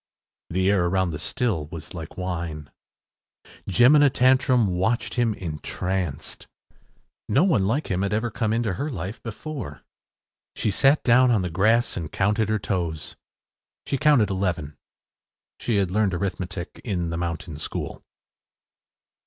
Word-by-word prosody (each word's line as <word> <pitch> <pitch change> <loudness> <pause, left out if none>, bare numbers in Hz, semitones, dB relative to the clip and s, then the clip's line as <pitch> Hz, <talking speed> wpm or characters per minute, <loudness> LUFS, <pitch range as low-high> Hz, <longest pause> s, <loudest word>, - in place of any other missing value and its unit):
The 95 +3 +2
air 95 -3 +2
around 95 -1 +1
the 75 - -5
still 95 -11 -1
was 80 -1 -8
like 80 -3 -8
wine. 85 -5 -4 1.0
Jemina 140 - +6
Tantrum 130 -1 +4
watched 95 +5 0
him 115 -3 +1
entranced. 85 -1 -4 0.8
No 140 - +4
one 110 - +3
like 135 +5 -1
him 95 0 0
had 100 0 0
ever 110 +2 0
come 110 0 -1
into 115 -3 0
her 140 - -3
life 110 -5 -5
before. 115 - -7 0.7
She 105 - 0
sat 135 +8 +4
down 125 +1 +5
on 110 -6 +2
the 90 - -3
grass 110 +7 +2
and 80 -3 -5
counted 105 +2 +1
her 110 - +2
toes. 85 -6 -3 0.7
She 135 - -1
counted 140 -10 +4
eleven. 90 -6 -2 0.8
She 115 - -1
had 95 -3 +1
learned 100 -2 +1
arithmetic 95 -1 -4
in 90 -7 -2
the 85 - -3
mountain 85 -3 -4
school. - - -5
95 Hz, 140 wpm, -24 LUFS, 85-120 Hz, 1.0 s, Jemina